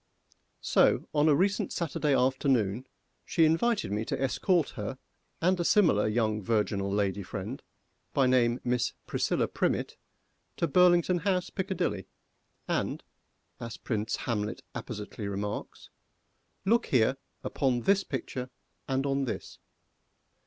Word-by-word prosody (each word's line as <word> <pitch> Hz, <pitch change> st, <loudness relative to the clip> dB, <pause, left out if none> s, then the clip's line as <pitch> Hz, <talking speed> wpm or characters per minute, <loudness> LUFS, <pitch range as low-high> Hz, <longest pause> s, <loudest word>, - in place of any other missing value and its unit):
So, -, -, +3 dB
on 150 Hz, +1 st, +4 dB
a 145 Hz, -, +5 dB
recent 195 Hz, +4 st, +1 dB
Saturday 150 Hz, -3 st, 0 dB
afternoon, 130 Hz, -3 st, +1 dB, 0.4 s
she 165 Hz, -, +3 dB
invited 200 Hz, -, +1 dB
me 105 Hz, +2 st, -1 dB
to -, -, -3 dB
escort 155 Hz, +5 st, +1 dB
her 105 Hz, +5 st, -5 dB, 0.5 s
and 185 Hz, +1 st, +3 dB
a -, -, +1 dB
similar 165 Hz, -, +4 dB
young 110 Hz, -1 st, 0 dB
virginal 100 Hz, -2 st, 0 dB
lady 100 Hz, -1 st, 0 dB
friend, 100 Hz, +7 st, -6 dB, 0.5 s
by 135 Hz, -, +3 dB
name 125 Hz, -1 st, +3 dB
Miss 125 Hz, -1 st, 0 dB
PRISCILLA -, -, 0 dB
PRIMMETT, -, -, -1 dB, 0.6 s
to 170 Hz, -, +1 dB
Burlington 175 Hz, +2 st, +4 dB
House, 180 Hz, 0 st, 0 dB
Piccadilly, 180 Hz, -, -2 dB, 0.6 s
and, -, -, -1 dB, 0.6 s
as 115 Hz, 0 st, -6 dB
Prince 110 Hz, -2 st, -2 dB
Hamlet 105 Hz, -4 st, -2 dB
appositely 105 Hz, 0 st, -6 dB
remarks, 100 Hz, +1 st, -5 dB, 0.7 s
"Look 235 Hz, +4 st, +3 dB
here 130 Hz, +1 st, +3 dB, 0.3 s
upon 130 Hz, -3 st, 0 dB
this 195 Hz, +7 st, +3 dB
picture 125 Hz, -1 st, -4 dB, 0.4 s
and 135 Hz, 0 st, 0 dB
on 135 Hz, 0 st, 0 dB
this." 120 Hz, -, -6 dB
130 Hz, 125 wpm, -29 LUFS, 110-170 Hz, 0.7 s, a